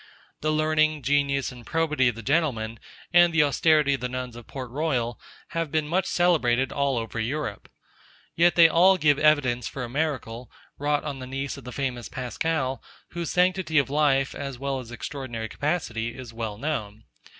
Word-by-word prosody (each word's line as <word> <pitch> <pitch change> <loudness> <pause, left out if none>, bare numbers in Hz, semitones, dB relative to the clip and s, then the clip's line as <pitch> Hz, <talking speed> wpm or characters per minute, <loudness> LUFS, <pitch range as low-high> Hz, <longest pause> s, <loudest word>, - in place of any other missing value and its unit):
The 155 - +1
learning, 155 -1 +2
genius, 140 0 +1
and 125 -1 -12
probity 150 -3 +1
of 120 - 0
the 115 - -9
gentlemen, 115 -6 0 0.3
and 175 0 +6
the 165 -2 +4
austerity 150 0 +3
of 135 - -3
the 125 - -2
nuns 125 -1 -5
of 120 -1 -11
Port 130 -3 -7
Royal, 125 -5 -1 0.3
have 165 -3 -2
been 155 -1 0
much 180 +4 0
celebrated 135 -8 +2
all 140 -2 0
over 115 0 -4
Europe. 120 -2 -3 0.7
Yet 170 +1 +4
they 170 -1 +8
all 185 +4 +5
give 150 -4 +3
evidence 130 -6 +3
for 135 - -5
a 120 - -5
miracle, 130 -4 -3 0.3
wrought 145 +1 0
on 145 -3 -5
the 130 - -7
niece 135 +1 -4
of 140 -4 -12
the 125 - -7
famous 125 -3 -3
Pascal, 130 +1 -2 0.3
whose 170 -2 -4
sanctity 180 -3 +1
of 140 -1 +3
life, 140 -2 +2
as 140 -3 -5
well 135 0 -2
as 120 -3 -9
extraordinary 120 -2 -5
capacity, 120 -8 -2
is 125 -3 -9
well 110 -2 -4
known. 110 -6 -4
140 Hz, 180 wpm, -25 LUFS, 120-155 Hz, 0.7 s, they